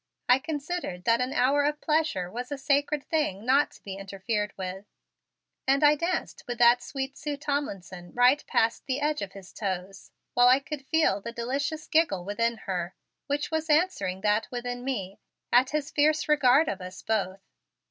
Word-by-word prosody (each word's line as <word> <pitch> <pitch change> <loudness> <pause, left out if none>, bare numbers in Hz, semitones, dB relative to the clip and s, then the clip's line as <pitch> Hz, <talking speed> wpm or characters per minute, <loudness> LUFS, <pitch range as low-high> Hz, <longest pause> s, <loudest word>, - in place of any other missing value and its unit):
I 250 +1 +6
considered 295 - -4
that 230 +1 +3
an 250 +1 -1
hour 275 +3 +3
of 295 +1 0
pleasure 305 - 0
was 245 +5 -6
a 285 - -2
sacred 285 +1 +1
thing 265 - -1
not 275 +4 +4
to - - -18
be 195 -1 -6
interfered 195 +2 -3
with, 190 +1 -5 0.8
and 275 +2 +3
I 295 0 +7
danced 335 +5 -2
with 245 -1 -3
that 240 +1 +6
sweet 270 +1 -5
Sue 290 0 -4
Tomlinson 195 - -4
right 250 +4 +4
past 225 +1 +1
the 265 0 -1
edge 295 -3 0
of 195 -1 -5
his 195 -2 -12
toes 195 -1 -5 0.2
while 245 0 +5
I 255 +2 +6
could 280 -1 -7
feel 315 -12 +2
the 235 - -6
delicious 275 +6 -3
giggle 290 - +1
within 230 +3 0
her, 180 -2 -3 0.3
which 290 +2 -2
was 320 0 -2
answering 300 - +1
that 210 +1 +1
within 245 0 -4
me, 200 -8 -4 0.3
at 250 +2 +5
his 300 -2 -2
fierce 305 +1 +2
regard 295 0 +5
of 195 -1 -3
us 185 +1 -9
both. 195 -3 -1
250 Hz, 180 wpm, -27 LUFS, 200-290 Hz, 0.8 s, I